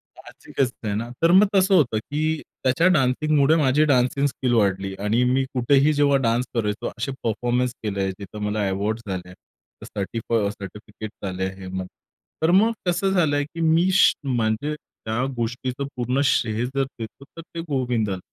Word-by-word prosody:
साहजिकचं 125 -4 -4
आहे 100 - -1
ना. 115 +3 -3
तर 165 - +6
मग 195 +3 +7
तसं 190 0 +4
होतं 130 -10 +3
की 155 +5 -2 0.2
त्याच्या 130 +7 +3
डान्सिंगमुळे 145 +2 +3
माझी 150 -1 +3
डान्सिंग 130 +2 +2
स्किल 130 -2 -1
वाढली. 95 -3 +1
आणि 110 +4 +1
मी 135 +1 +2
कुठेही 135 +4 +3
जेव्हा 145 -1 +3
डान्स 120 +2 +1
करायचो. 105 -2 -1
असे 130 +4 -2
परफॉर्मन्स 120 +2 0
केले, 100 -2 -1
जिथं 100 +2 -9
मला 105 -1 0
अवॉर्ड 105 +4 -1
झाले. 90 -2 -5 0.5
सर्टिफ 110 +4 -5 0.2
सर्टिफिकेट्स 105 +1 -9
आले 95 0 -2
आहेत 95 0 -7
मग. 95 0 -3 0.6
तर 160 - +4
मग 210 +5 +5 0.2
कसं 190 +2 +1
झालं, 155 -6 +2
की 165 +3 -7
मी, 165 +3 +3
श 185 - +6
म्हणजे 120 +2 0
त्या 115 -4 -5
गोष्टीचं 125 +4 -3
पूर्ण 125 +2 0
श्रेय 115 -2 +1
जर 135 +2 -1 0.2
देतो, 115 +4 -8
तर 165 - -7
ते 165 0 -10
गोविंदाला. 120 -8 -1
125 Hz, 160 wpm, -23 LUFS, 105-145 Hz, 0.6 s, मग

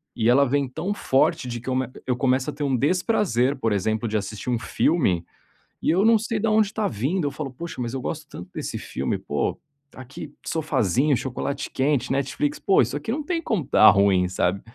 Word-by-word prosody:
e 115 0 +2
ela 140 +3 +5
vem 140 +1 +1
tão 175 +10 -3
forte 135 -8 +1
de 120 -1 -4
que 120 - -7
eu 130 - 0 0.3
eu 125 - +1
começo 130 +2 +1
a - - -4
ter 145 - -5
um 135 -2 +1
desprazer, 145 - +1
por 115 -4 0
exemplo, 110 +3 0
de 110 0 0
assistir 105 +2 -5
um 120 - +1
filme, 115 - +1 0.6
e - - 0
eu 185 +6 +3
não 225 0 +6
sei 220 0 -2
da 225 +1 +1
onde 215 -1 +4
está 215 0 -2
vindo, 145 - -1
eu - - -2
falo: 140 -2 -5
"Poxa, 165 +1 -7
mas 120 0 -3
eu 135 - -2
gosto 155 +4 -4
tanto 90 +1 -9
desse - - -4
filme, - - -3
pô, - - -2 0.4
aqui 135 +3 -9
sofázinho, 140 - +1
chocolate 135 +3 -4
quente, 135 -1 0
Netflix, 140 +2 -1
pô 195 - +4
isso 120 +2 -1
aqui 150 +9 -4
não 300 +5 -2
tem 335 +2 -2
como 215 - -1
estar 110 - +7
ruim, 95 -2 +3
sabe". 90 +1 0
135 Hz, 210 wpm, -24 LUFS, 120-165 Hz, 0.6 s, estar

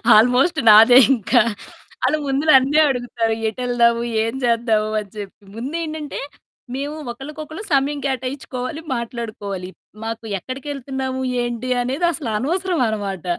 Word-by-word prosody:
Almost 250 +9 +4
నాదే 225 +4 +9 0.2
ఇంకా. 240 +2 +3 0.6
ఆళ్ళు 310 - +2
ముందు 275 +1 0
నన్నే 270 +3 +5
అడుగుతారు, 240 -3 -1 0.2
"ఎటెళ్దాము? 235 0 +1 0.2
ఏం 230 - -3
చేద్దాము?" 230 -2 +1
అని 200 - -12
చెప్పి. 205 0 -9
ముందేంటంటే, 310 +4 -4 0.6
మేము 285 +3 -4 0.2
ఒకళ్ళకొకళ్ళు 305 - -8
సమయం 280 +1 +1
కేటాయించుకోవాలి, 260 +2 -4
మాట్లాడుకోవాలి. 215 -6 -5 0.3
మాకు 225 0 -5
ఎక్కడికెళ్తున్నాము? 265 +1 -5 0.2
ఏంటి? 240 +1 -4
అనేది 270 +8 -1
అసలు 290 -7 -4
అనవసరం 350 - -1
అనమాట. 200 -4 -4
255 Hz, 110 wpm, -20 LUFS, 230-285 Hz, 0.6 s, నాదే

